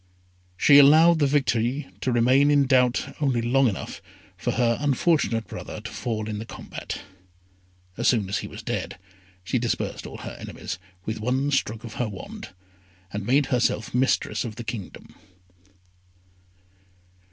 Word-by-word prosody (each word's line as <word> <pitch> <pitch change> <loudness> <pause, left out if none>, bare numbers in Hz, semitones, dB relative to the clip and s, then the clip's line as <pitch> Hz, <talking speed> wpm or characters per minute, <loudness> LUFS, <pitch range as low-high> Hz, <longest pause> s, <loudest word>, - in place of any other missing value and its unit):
She 140 +8 +7
allowed 160 +4 +7
the 145 - +3
victory 130 0 +1 0.2
to 125 - 0
remain 130 +4 +4
in 145 -1 +4
doubt 125 -2 +2
only 135 -5 +2
long 125 +3 +3
enough 100 - -4 0.3
for - - -2
her 115 -1 +1
unfortunate 140 -5 +1
brother - - -7
to 115 +3 -8
fall 110 -3 -3
in 105 -1 -4
the - - -4
combat. - - -7 1.0
As 120 - 0
soon 110 -6 +3
as 100 - -1
he - - -6
was - - -10
dead, - - -3 0.5
she 120 +7 0
dispersed 120 -1 -2
all - - -9
her - - -8
enemies 85 - -6 0.3
with 110 0 -3
one 130 +5 0
stroke 115 -4 -1
of 115 -2 -8
her 120 - -1
wand, 95 -1 -8 0.6
and 100 0 -4
made 140 +3 +4
herself 120 -3 0
mistress 130 +2 +1
of 115 -4 -6
the 120 - -6
kingdom. 105 -3 -7
120 Hz, 150 wpm, -25 LUFS, 110-135 Hz, 1.0 s, She